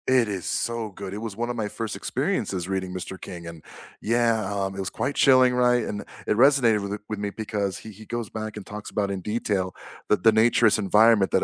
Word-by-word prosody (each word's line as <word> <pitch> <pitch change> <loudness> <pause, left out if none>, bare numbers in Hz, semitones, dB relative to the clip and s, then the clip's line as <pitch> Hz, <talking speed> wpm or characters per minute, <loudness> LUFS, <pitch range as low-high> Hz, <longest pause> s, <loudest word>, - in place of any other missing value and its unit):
It 130 -3 +4
is 95 -4 -4
so 115 -2 -2
good. 95 -1 -8
It 105 - -5
was 110 -3 -5
one 120 +1 -2
of 120 - -2
my 110 -3 -2
first 110 -1 -4
experiences 90 -3 -2
reading 95 -1 -2
Mr. 95 0 -6
King, 85 -3 -8
and 85 -2 -9 0.4
yeah, 115 -1 +2
um, 95 -1 -2
it - - -7
was 95 - -2
quite 140 - -2
chilling, 130 -2 +5
right? 125 -1 +3
And 105 -1 -4 0.2
it - - +1
resonated 125 -5 +5
with 100 0 -5
th 105 - -4
with 105 -1 -4
me 105 0 -2
because 100 -3 -3
he 110 - -10
he 110 +2 -13
goes 120 0 -4
back 110 -1 -6
and 100 - -8
talks 105 0 -8
about 100 -1 -1
in 95 -1 -3
detail 100 -3 -2 0.3
that 105 - +2
the 110 - +7
naturous 110 0 +4
environment 105 0 +4
that - - +2
105 Hz, 230 wpm, -25 LUFS, 100-115 Hz, 0.4 s, the